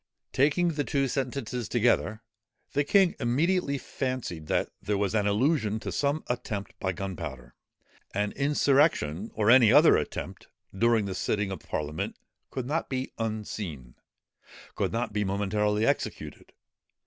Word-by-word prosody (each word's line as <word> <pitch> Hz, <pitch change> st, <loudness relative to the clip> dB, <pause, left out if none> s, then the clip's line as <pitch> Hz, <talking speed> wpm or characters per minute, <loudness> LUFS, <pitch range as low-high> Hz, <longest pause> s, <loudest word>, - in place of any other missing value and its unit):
_ -, -, -57 dB
Taking 155 Hz, +6 st, +3 dB
the 150 Hz, -3 st, -1 dB
two 140 Hz, -1 st, 0 dB
sentences 125 Hz, -2 st, -3 dB
together, 115 Hz, -2 st, +1 dB, 0.5 s
the 145 Hz, +1 st, +2 dB
king 190 Hz, +4 st, +4 dB
immediately 140 Hz, +5 st, +1 dB
fancied 130 Hz, -, -4 dB
that -, -, 0 dB
there 105 Hz, -1 st, -1 dB
was 100 Hz, -2 st, 0 dB
an 105 Hz, -2 st, +2 dB
allusion 110 Hz, 0 st, +1 dB
to -, -, -4 dB
some 145 Hz, +2 st, 0 dB
attempt 105 Hz, -4 st, -4 dB
by 95 Hz, -, 0 dB
gunpowder. 80 Hz, -10 st, -6 dB, 0.6 s
An 105 Hz, +1 st, -1 dB
insurrection, 140 Hz, -, +2 dB
or 110 Hz, +1 st, +4 dB
any 120 Hz, -4 st, +7 dB
other -, -, +7 dB
attempt, -, -, -5 dB, 0.3 s
during 115 Hz, 0 st, +3 dB
the 95 Hz, -, -3 dB
sitting 100 Hz, +2 st, -1 dB
of 95 Hz, -, -5 dB
parliament, 75 Hz, +9 st, -4 dB, 0.3 s
could 130 Hz, -, -4 dB
not 155 Hz, +5 st, -2 dB
be 130 Hz, 0 st, -3 dB
unseen; 105 Hz, -, -4 dB, 0.8 s
could -, -, -1 dB
not 115 Hz, -1 st, -2 dB
be 105 Hz, 0 st, 0 dB
momentarily 105 Hz, +2 st, 0 dB
executed. -, -, -2 dB
110 Hz, 140 wpm, -28 LUFS, 100-135 Hz, 0.8 s, any